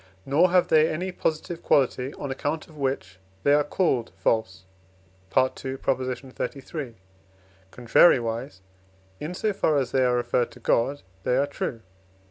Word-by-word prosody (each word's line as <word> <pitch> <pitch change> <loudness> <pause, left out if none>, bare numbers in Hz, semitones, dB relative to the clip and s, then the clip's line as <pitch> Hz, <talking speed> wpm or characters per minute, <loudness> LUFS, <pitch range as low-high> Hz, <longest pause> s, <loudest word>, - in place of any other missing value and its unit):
nor 155 +7 +4
have 180 0 +3
they 155 0 +5
any 180 +4 -3
positive 165 0 -3
quality 130 -1 +2
on 140 - -5
account 145 +4 -3
of 160 - -17
which 130 -10 -3 0.2
they 145 - +4
are 150 0 +4
called 145 -7 0
false 110 -1 -1 0.7
(II. 130 0 +1
xxxiii.); 130 +1 -4 0.8
contrariwise, 120 - +3 0.6
in 165 +4 -5
so 215 +2 0
far 155 -6 +1
as 130 -4 -1
they 130 - +3
are 125 -1 +3
referred 120 0 0
to - - -15
God, 140 +5 +1 0.2
they 125 +6 +1
are 140 - +3
true 145 -3 -4
(II. 115 - -20
135 Hz, 145 wpm, -25 LUFS, 125-155 Hz, 0.8 s, they